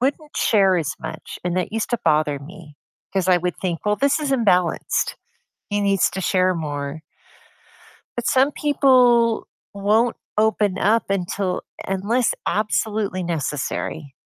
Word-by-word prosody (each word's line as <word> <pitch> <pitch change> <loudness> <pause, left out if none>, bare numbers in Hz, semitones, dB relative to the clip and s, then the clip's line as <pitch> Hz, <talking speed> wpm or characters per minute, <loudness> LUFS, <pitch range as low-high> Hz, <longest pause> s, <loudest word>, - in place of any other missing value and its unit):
wouldn't 290 +4 -2
share 195 -3 +3
as 160 -5 -1
much, 160 - -7
and 175 -1 -1
that 180 - -1
used 225 +2 -2
to 240 - 0
bother 150 -1 +2
me, 150 0 -13 0.4
'cause 190 -1 0
I 180 - +6
would 175 0 -2
think, 175 -2 -3
"Well, 210 0 +1
this 280 +2 +2
is 295 -2 -2
imbalanced, 185 -9 +1 0.5
he 205 -1 0
needs 200 -1 +2
to 190 +2 -4
share 185 0 +2
more." 145 -2 -4 1.2
But 240 -1 -3
some 265 +3 +3
people 250 -6 +3 0.2
won't 210 +4 +2 0.2
open 210 -3 +2
up 220 +1 +2
until 190 0 -1 0.2
unless 205 +6 +1
absolutely 210 -2 -1
necessary 150 -2 -3
195 Hz, 140 wpm, -22 LUFS, 175-230 Hz, 1.2 s, I